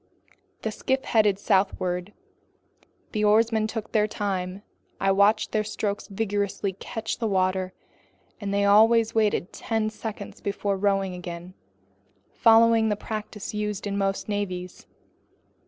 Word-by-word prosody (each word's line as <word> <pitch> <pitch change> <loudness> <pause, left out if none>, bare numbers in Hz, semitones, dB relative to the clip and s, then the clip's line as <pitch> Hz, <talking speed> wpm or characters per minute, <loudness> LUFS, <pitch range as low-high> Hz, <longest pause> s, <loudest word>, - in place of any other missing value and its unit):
The 220 - -1
skiff 265 +5 -1
headed 210 -4 +3
southward. 190 -2 0 1.0
The 215 -2 -1
oarsmen 220 +1 +3
took 220 -1 -5
their 215 -1 +3
time. 195 -2 -3 0.4
I 195 - +2
watched 200 +2 +3
their 215 - +1
strokes 210 -1 -3
vigorously 200 -1 -2
catch 220 +3 -5
the 230 - 0
water, 185 -1 0 0.7
and 200 -2 -4
they 200 0 +2
always 225 +2 +5
waited 210 -4 +1
ten 220 -1 -1
seconds 215 -2 -7
before 200 0 -1
rowing 195 -1 +1
again, 175 0 -7 0.8
following 225 -1 +5
the 210 - +1
practice 210 0 -6
used 210 -1 -3
in 200 -1 -2
most 195 -1 -1
navies. 185 -4 -4
205 Hz, 125 wpm, -26 LUFS, 195-220 Hz, 1.0 s, always